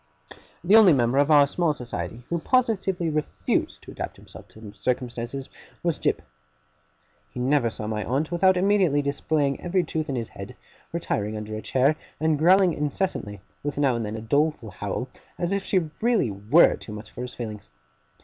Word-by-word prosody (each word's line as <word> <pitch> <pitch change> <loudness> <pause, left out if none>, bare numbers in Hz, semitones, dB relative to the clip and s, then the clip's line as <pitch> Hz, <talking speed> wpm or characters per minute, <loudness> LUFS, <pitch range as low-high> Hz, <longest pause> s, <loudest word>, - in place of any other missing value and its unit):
The 190 +5 +5
only 210 -6 +8
member 125 0 +2
of 145 +1 +3
our 145 -2 +7
small 160 +2 0
society 115 -4 -6
who 170 - -1
positively 190 -6 +1
refused 155 0 -2
to - - -10
adapt - - -6
himself - - -13
to 110 -2 -12
circumstances, 125 +1 -3 0.4
was 170 -2 0
Jip. - - 0 1.1
He 125 - -8
never 130 -1 +2
saw 110 -1 -6
my 105 0 -2
aunt 145 +6 -1
without 185 +2 +3
immediately 185 -7 +3
displaying 140 0 0
every 180 +1 +1
tooth 160 -2 -3
in 135 - -1
his 115 -3 -3
head, - - -9 0.4
retiring 105 +1 -2
under 105 0 -6
a 110 - -5
chair, 135 +6 +2 0.2
and 155 -2 +1
growling 180 +2 +5
incessantly: 145 - -2 0.2
with 145 0 -4
now 140 -4 +2
and 115 - -2
then 105 0 -4
a 110 - -5
doleful 140 -1 0
howl, 105 +6 -4 0.3
as 175 +2 -1
if 200 -1 -1
she 175 -6 0
really 230 - +2
were 105 +12 +4
too 105 - -9
much 105 0 -9
for - - -8
his 125 0 -6
feelings. 105 -4 -7
140 Hz, 180 wpm, -25 LUFS, 115-170 Hz, 1.1 s, only